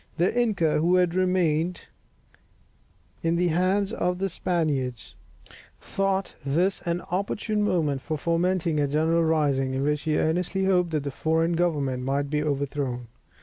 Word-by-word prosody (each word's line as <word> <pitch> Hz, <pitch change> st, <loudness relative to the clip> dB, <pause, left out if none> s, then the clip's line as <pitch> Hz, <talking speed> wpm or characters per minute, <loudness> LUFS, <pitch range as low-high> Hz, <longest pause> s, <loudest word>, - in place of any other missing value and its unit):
The 175 Hz, +6 st, +1 dB
inca, 205 Hz, -11 st, +2 dB
who 175 Hz, +3 st, +3 dB
had 180 Hz, -2 st, +3 dB
remained 180 Hz, -2 st, +1 dB, 1.4 s
in 165 Hz, 0 st, +1 dB
the 175 Hz, +1 st, +2 dB
hands 190 Hz, +5 st, +1 dB
of 180 Hz, -2 st, -1 dB
the 195 Hz, +1 st, -1 dB
Spaniards, 150 Hz, -9 st, -2 dB, 0.7 s
thought 195 Hz, -1 st, -1 dB
this 175 Hz, +8 st, +1 dB
an 170 Hz, +1 st, 0 dB
opportune 210 Hz, +3 st, -1 dB
moment 155 Hz, -9 st, 0 dB
for 155 Hz, +2 st, -3 dB
fomenting 170 Hz, 0 st, 0 dB
a 145 Hz, -, +2 dB
general 160 Hz, +3 st, +2 dB
rising, 140 Hz, -5 st, +1 dB
in 135 Hz, -, -1 dB
which 150 Hz, +1 st, 0 dB
he 155 Hz, -1 st, 0 dB
earnestly 180 Hz, +4 st, 0 dB
hoped 180 Hz, -2 st, +2 dB
that 155 Hz, -3 st, -1 dB
the 140 Hz, -, -3 dB
foreign 160 Hz, +4 st, 0 dB
government 145 Hz, -7 st, 0 dB
might 140 Hz, +2 st, -1 dB
be 150 Hz, 0 st, +1 dB
overthrown. 140 Hz, -4 st, -2 dB
165 Hz, 150 wpm, -26 LUFS, 145-180 Hz, 1.4 s, who